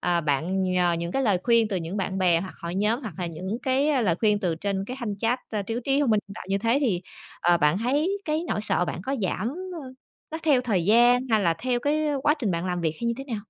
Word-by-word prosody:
ờ, 175 -1 +1
bạn 165 +6 0
nhờ 180 -1 +2
những 170 +1 -4
cái 270 - 0
lời 205 -7 +2
khuyên 230 -2 +3
từ 195 - -1
những 170 +3 -4
bạn 190 -1 -2
bè 175 -3 +3
hoặc 190 +1 -7
hội 170 +1 -4
nhóm 210 +5 +1
hoặc 215 -9 -6
là 180 - -2
những 185 +7 -4
cái, 270 +3 +2
a, 285 -4 +2
lời 185 -8 +2
khuyên 210 +2 +2
từ 180 -5 0
trên 195 +3 -2
cái 250 +4 -6
thanh 210 -4 -4
chat, 230 +4 +1
à, 210 -2 -2
trí 225 +3 -4
trí 275 +1 +2
thông 280 -5 +2
minh 215 -1 +3
nhân 200 - -9
tạo - - -8
như 195 - +1
thế 230 +6 +2
thì, 215 -11 +1 0.4
ờ, 175 0 +4
bạn 150 +3 +3
thấy 295 - 0
cái 310 +1 -1
nỗi - - -1
sợ 210 -4 +1
bạn 175 - -5
có 270 +7 -2
giảm, 190 +4 -1 0.3
ơ, 260 -1 -9 0.4
nó 320 - -4
theo 290 -5 +4
thời 205 -9 0
gian 240 +4 +5
hay 220 -1 +4
là 170 -4 +2
theo 245 +7 -1
cái, 305 +3 0
ơ, 290 -2 0
quá 295 - +4
trình 225 -8 -1
bạn 170 +1 -2
làm 180 -1 -2
việc 160 -2 0
hay - - -5
như 235 - +1
thế 270 - -6
nào? 230 -6 -4
210 Hz, 285 wpm, -25 LUFS, 180-250 Hz, 0.4 s, gian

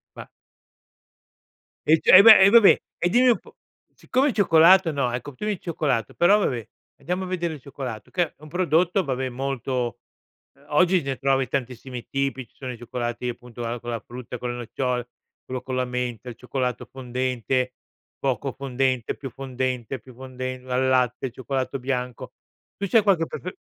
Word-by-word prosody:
Ma - - -10 1.6
I 160 +1 +5
c - - -13
eh 185 - +11
beh, 220 -3 +10
e 190 - +7
vabbè, 225 -1 +7 0.2
e 175 - 0
dimmi 250 +5 +4
un 235 - +4
po' - - -19 0.4
siccome 270 +3 +1
il - - -2
cioccolato 180 -2 +5
no, 140 -4 -1
ecco 125 +3 -5
tu 210 - -6
il 210 -4 -1
cioccolato, 140 - -2
però 200 +5 +5
vabbè, 120 - -2 0.3
andiamo 180 +2 -3
a - - -7
vedere 175 -3 -2
il 145 - -10
cioccolato 125 -5 -7
che 175 - +1
è 160 - -7
un 155 - -12
prodotto, 175 +2 +2
vabbè 130 -2 -2
molto 130 -1 -3 0.6
ehm, 140 +1 -24
oggi 180 +3 +3
ne 135 -1 -3
trovi 135 -1 +1
tantissimi 125 -1 -5
tipi, 135 -3 -2
ci - - -38
sono 130 -2 -6
i - - -10
cioccolati 120 0 -4
appunto 120 0 -8
a 115 +1 -3
con 120 0 -6
la 115 - -2
frutta, 125 +1 -9
con 125 - -4
le - - -5
nocciole, 125 +1 -3 0.4
quello 130 -1 -5
con 130 -1 -5
la 130 0 0
menta, 125 -1 -4
il 115 - -8
cioccolato 125 0 -3
fondente, 125 -1 -2 0.4
poco 135 0 -1
fondente, 130 -2 -1
più 135 - -7
fondente, 130 -1 -4
più 125 +2 -16
fonden 130 0 -7
al 130 +1 +1
latte, 125 0 +1
cioccolato 130 +1 -3
bianco. 125 -1 -4 0.4
Tu 200 - -2
c'hai 220 +2 +4
qualche 185 -5 +2
pref 180 - -6
130 Hz, 180 wpm, -24 LUFS, 125-160 Hz, 1.6 s, eh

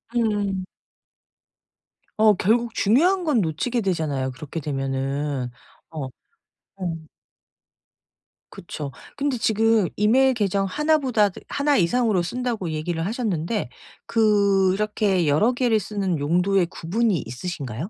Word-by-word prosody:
음. 205 -5 0 1.5
어 215 -1 +6
결국 225 +5 +1
중요한 340 - +3
건 295 -9 +2
놓치게 210 +9 -1
되잖아요 150 -8 -1
그렇게 150 +5 -7
되면은. 135 -1 -2 0.4
어 155 -4 -4 0.7
어. 165 -4 -5 1.4
그렇죠. 145 -2 -7 0.3
근데 280 -3 0
지금 220 -2 +2
이메일 255 +6 +4
계정 200 -3 0
1 300 +10 +2
보다 240 -8 +2
그 180 - -11
"1 285 0 +1
이상으로 205 +1 +2
쓴다."고 230 -4 -3
얘기를 165 +2 -2
하셨는데 205 - -2 0.4
그렇게 200 -3 +2
여러 155 +12 +3
개를 240 -3 +2
쓰는 195 -4 -2
용도의 180 +5 +2
구분이 195 +4 0
있으신가요? 135 - -5
195 Hz, 240 characters per minute, -23 LUFS, 160-225 Hz, 1.5 s, 어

